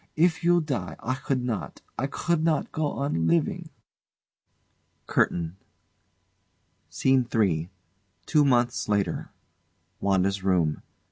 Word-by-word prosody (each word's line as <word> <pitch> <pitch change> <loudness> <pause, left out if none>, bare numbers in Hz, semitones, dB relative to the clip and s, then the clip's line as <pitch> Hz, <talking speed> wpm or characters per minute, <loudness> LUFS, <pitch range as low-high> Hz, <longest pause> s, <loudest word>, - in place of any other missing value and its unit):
If 165 +1 +2
you 175 0 +4
die 110 - -3
I 130 - -2
could 130 -1 -2
not 120 -4 -4
I 135 - -1
could 170 +3 -1
not 160 -2 +1
go 155 -2 -1
on 135 - -1
living! 170 0 +1 1.4
CURTAIN 85 +1 0 1.3
SCENE 130 -2 +2
III. 90 -8 +1 0.6
TWO 150 -2 +4
MONTHS 120 -5 +2
LATER 100 -1 0 0.7
WANDA'S 95 0 +1
room. 85 -6 +1
125 Hz, 110 wpm, -26 LUFS, 95-155 Hz, 1.4 s, you